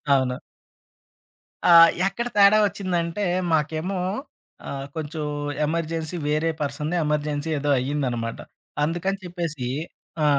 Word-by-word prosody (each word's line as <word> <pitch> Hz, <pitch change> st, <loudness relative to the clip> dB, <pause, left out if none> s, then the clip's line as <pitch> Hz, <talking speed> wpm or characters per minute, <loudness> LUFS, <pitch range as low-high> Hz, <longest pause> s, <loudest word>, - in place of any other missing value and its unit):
అవును. 130 Hz, -1 st, +1 dB, 1.3 s
ఆహ్, 165 Hz, -1 st, +10 dB, 0.2 s
ఎక్కడ 235 Hz, +5 st, -2 dB
తేడా 200 Hz, +1 st, +7 dB
ఒచ్చిందంటే 185 Hz, -1 st, -2 dB, 0.3 s
మాకేమో 160 Hz, +5 st, 0 dB, 0.7 s
ఆహ్, 135 Hz, -1 st, -4 dB
కొంచెం 155 Hz, 0 st, -4 dB, 0.4 s
ఎమర్జెన్సీ 165 Hz, +1 st, -2 dB
వేరే 155 Hz, +2 st, +1 dB
పర్సన్‌ని 150 Hz, +3 st, -2 dB
ఎమర్జెన్సీ 150 Hz, +1 st, -1 dB
ఏదో 145 Hz, -, -1 dB
అయిందనమాట. 125 Hz, -4 st, -2 dB, 0.4 s
అందుకని 175 Hz, +5 st, -1 dB
చెప్పేసి 170 Hz, -7 st, -4 dB, 0.6 s
ఆ! -, -, +4 dB
160 Hz, 100 wpm, -24 LUFS, 145-175 Hz, 1.3 s, ఆహ్